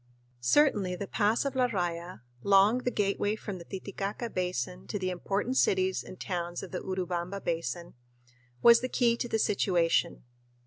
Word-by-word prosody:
Certainly 195 - +3
the 200 - -4
pass 215 +6 +1
of 275 -1 -2
La 255 -1 +3
Raya, 175 - -3 0.2
long 200 - +5
the 250 - -1
gateway 205 -1 0
from 200 -3 -6
the - - -9
Titicaca 200 +4 -5
Basin 125 - -3
to - - -3
the 185 -1 -2
important 200 +8 -2
cities 190 0 +2
and 185 - -11
towns 175 -2 -3
of 190 - -8
the 180 - -3
Urubamba 185 0 -3
Basin, 170 -1 -3 0.7
was 235 0 +8
the 255 - -2
key 235 -2 +2
to 240 - -3
the 225 - +1
situation. 175 -5 +1
190 Hz, 165 wpm, -29 LUFS, 175-215 Hz, 0.7 s, was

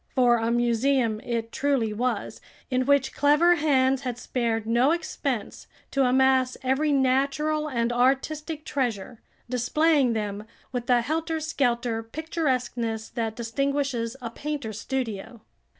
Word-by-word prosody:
For 245 -2 +5
a 225 0 -1
museum 240 -1 +1
it 230 0 -3
truly 265 -6 0
was, 250 +4 -2 0.3
in 255 0 +1
which 280 -2 +3
clever 300 +5 +4
hands 270 -4 +2
had 250 -3 -4
spared 230 -3 -2
no 235 +4 +3
expense 290 -7 -3 0.2
to 275 -1 +2
amass 260 0 +3
every 270 +4 +1
natural 280 +3 +1
and 235 -3 0
artistic 295 +5 0
treasure, 240 -4 -3 0.3
displaying 265 +2 +2
them 210 -1 -3 0.3
with 245 -1 -4
the 245 -1 +4
helter 320 +5 -2
skelter 245 -7 0
picturesqueness 245 -5 -2
that 225 -2 -3
distinguishes 260 0 -1
a 230 - -4
painter's 265 -6 -5
studio. 235 -4 -4
255 Hz, 125 wpm, -26 LUFS, 235-285 Hz, 0.3 s, For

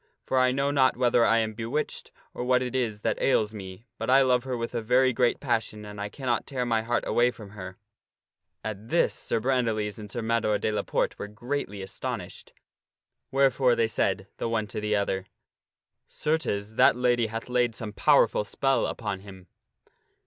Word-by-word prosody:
For 130 - +1
I 130 0 +4
know 140 +2 0
not 130 -3 +3
whether 120 -1 +3
I 115 0 +4
am 110 -1 0
bewitched 115 +7 -3 0.2
or - - -4
what 125 0 +3
it 125 - -4
is 115 -5 -1
that - - -1
ails 110 -5 +2
me, 95 +1 -9
but - - -3
I 135 +1 +6
love 125 -1 +2
her 130 -2 -2
with 115 +1 -4
a 120 - -1
very 125 +3 +3
great 120 0 +2
passion 110 -4 -2
and 105 0 -8
I 105 - -3
cannot 125 -1 -2
tear 130 -3 -2
my 115 -2 +1
heart 120 +2 -1
away 120 +1 +3
from 105 -5 -10
her." 95 -2 -8 0.9
At 110 +1 -6
this 170 - +2
Sir - - -2
Brandiles 115 -4 0
and 105 -1 -8
Sir 120 +2 -4
Mador 110 -2 +1
de 110 - -1
la 105 - 0
Porte - - -1
were - - -4
greatly 105 -2 -4
astonished, 95 0 -6 0.8
wherefore 135 -2 +3
they 115 - +2
said 95 -3 0
the - - -2
one 110 -2 0
to 105 - -4
the 105 0 0
other, 95 -2 -1 0.5
" - - -60
Certes, 110 -10 -1
that 110 - +5
lady 120 -2 +2
hath 115 +1 -5
laid 125 -2 +1
some 110 -3 -5
powerful 105 - +4
spell 135 +6 +1
upon 105 -4 -4
him." 95 -2 -12
115 Hz, 190 wpm, -27 LUFS, 105-125 Hz, 0.9 s, I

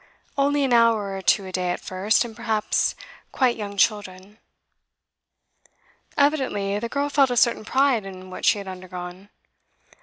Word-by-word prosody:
Only 285 +1 +2
an 260 -3 +1
hour 225 -4 +3
or 190 - -5
two 195 +1 +2
a 185 - -7
day 180 -1 -2
at 175 - -2
first, 195 +6 +1
and 225 -2 -9
perhaps 220 -2 0 0.4
quite 255 -3 +2
young 200 -2 -6
children.' 200 0 -1 1.8
Evidently 260 -9 +1
the 230 +2 -4
girl 285 +2 -1
felt 280 -2 +3
a 245 - -2
certain 235 -2 +2
pride 265 -3 +2
in 185 -1 -10
what - - -8
she - - +4
had 200 -1 -7
undergone. 185 +1 -8
210 Hz, 155 wpm, -23 LUFS, 190-245 Hz, 1.8 s, she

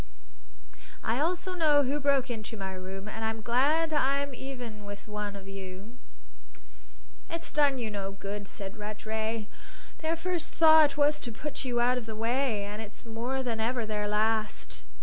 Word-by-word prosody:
"I 230 +3 +1
also 355 +4 0
know 305 -5 +5
who 280 +3 0
broke 275 -2 +3
into 225 0 -5
my 190 -1 -4
room, 190 +2 -6
and 220 +1 -5
I'm 220 0 -2
glad 300 +8 +3
I'm 280 -1 +2
even 245 -5 -6
with 205 +1 -8
one 210 -1 -3
of 195 -1 -9
you." 195 +3 -8 1.3
"It's 335 0 -4
done 285 -3 +4
you 230 -3 -2
no 195 -1 -3
good," 200 +1 -5
said 195 +2 -7
Rattray. 220 +1 -2 0.5
"Their 320 +1 0
first 345 -1 -2
thought 315 -3 +7
was 295 +1 +4
to 240 - -5
put 295 +6 -4
you 245 -2 +1
out 250 +1 +4
of 230 - -10
the 220 - -4
way, 230 -1 +1
and 205 +2 -5
it's 215 +1 -10
more 240 +4 -2
than 230 -3 -1
ever 235 +1 0
their 210 -1 -1
last. 215 +1 0
230 Hz, 170 wpm, -30 LUFS, 210-280 Hz, 1.3 s, thought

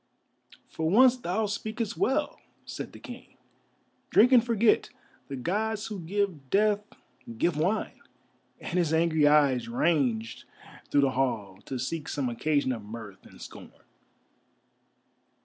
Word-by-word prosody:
"For 160 0 -2
once 250 +6 +6
thou 220 -2 -2
speakest 215 +2 -4
well," 285 +3 0 0.3
said - - -7
the - - -12
King. - - -12 0.7
"Drink 245 +4 +5
and 245 -3 +6
forget; 230 -2 +2 0.4
the 140 - -5
Gods 210 - -2
who 210 -3 -6
give 175 -5 -2
Death 210 +3 +2 0.6
give 170 +6 +1
wine," 180 +8 -1 0.6
and 180 - -2
his 160 -2 +1
angry 160 -2 +3
eyes 140 -5 +3
ranged 125 -5 0 0.4
through 145 - +3
the 135 -1 +2
hall, 110 -8 -2
to 130 - -4
seek 150 +5 -4
some 135 -4 -2
occasion 140 +3 0
of 115 -4 -5
mirth 105 -2 -10
and - - -17
scorn. - - -11
160 Hz, 130 wpm, -28 LUFS, 130-210 Hz, 0.7 s, once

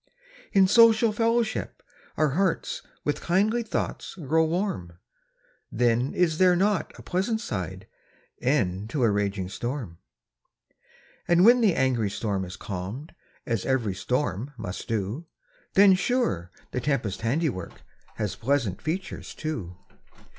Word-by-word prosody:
In 195 -1 +6
social 230 +1 +6
fellowship, 230 +1 0 0.3
our 155 -1 +3
hearts 185 +5 0 0.2
With 145 - -1
kindly 210 +7 +2
thoughts 220 - -3
grow 160 -1 +1
warm; 165 - -2 0.8
Then 120 +2 +1
is 165 -3 +2
there 180 -1 +6
not 195 +1 +1
a - - -12
pleasant 195 +5 -1
side, 95 - -5 0.6
E'en 105 -7 +1
to 125 +3 -1
a 115 - +4
raging 100 -2 -1
storm? 120 - -5 1.3
And 175 +2 +5
when 245 +2 +7
the 205 -6 +4
angry 125 -6 +1
storm 100 -1 -2
has 90 0 -8
calm'd, 100 - -6 0.3
As 115 -4 -1
ev'ry 120 -7 0
storm 125 - -2
must 100 -5 -6
do, 115 - -3 0.5
Then, 195 0 +8
sure, 185 - 0 0.2
the 125 - -2
tempest's 115 -8 -1
handiwork, 120 - -2 0.3
Has 105 -3 -2
pleasant 120 -6 0
features, 175 +5 -4
too. 105 - -5
140 Hz, 125 wpm, -26 LUFS, -, 1.3 s, Then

